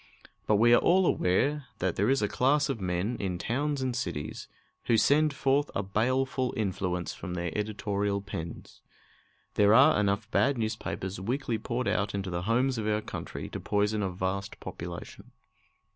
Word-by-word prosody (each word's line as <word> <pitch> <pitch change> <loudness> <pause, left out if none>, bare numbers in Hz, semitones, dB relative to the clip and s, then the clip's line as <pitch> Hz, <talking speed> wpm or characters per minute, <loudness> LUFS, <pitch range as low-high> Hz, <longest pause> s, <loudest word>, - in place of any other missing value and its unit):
But 105 - +4
we 120 +3 +5
are - - +7
all 185 +2 +4
aware 140 - +1
that 95 -3 -1
there 100 +5 +1
is 135 -4 +2
a - - +3
class 140 +7 +2
of 115 -6 -2
men 90 +6 -1
in 95 -3 -2
towns 140 +7 -1
and 130 -2 -1
cities 85 - -4 0.4
who 115 - +3
send 150 +5 +4
forth 140 +1 +1
a 100 - 0
baleful 130 +5 0
influence 90 -5 -2
from 90 +1 -6
their 85 -2 -3
editorial 105 -1 -1
pens. 85 -5 -8 0.7
There 105 +1 +5
are 140 +1 +6
enough 100 +1 0
bad 140 -1 +2
newspapers 110 -4 -3
weekly 120 +1 -1
poured 120 +3 -2
out 100 0 0
into 95 -2 -3
the 85 0 -2
homes 125 +1 +2
of 105 - -2
our 105 0 +1
country - - -6
to - - -5
poison 105 +1 0
a 95 - 0
vast 95 +2 -3
population. 85 +8 -8
105 Hz, 170 wpm, -29 LUFS, 95-130 Hz, 0.7 s, are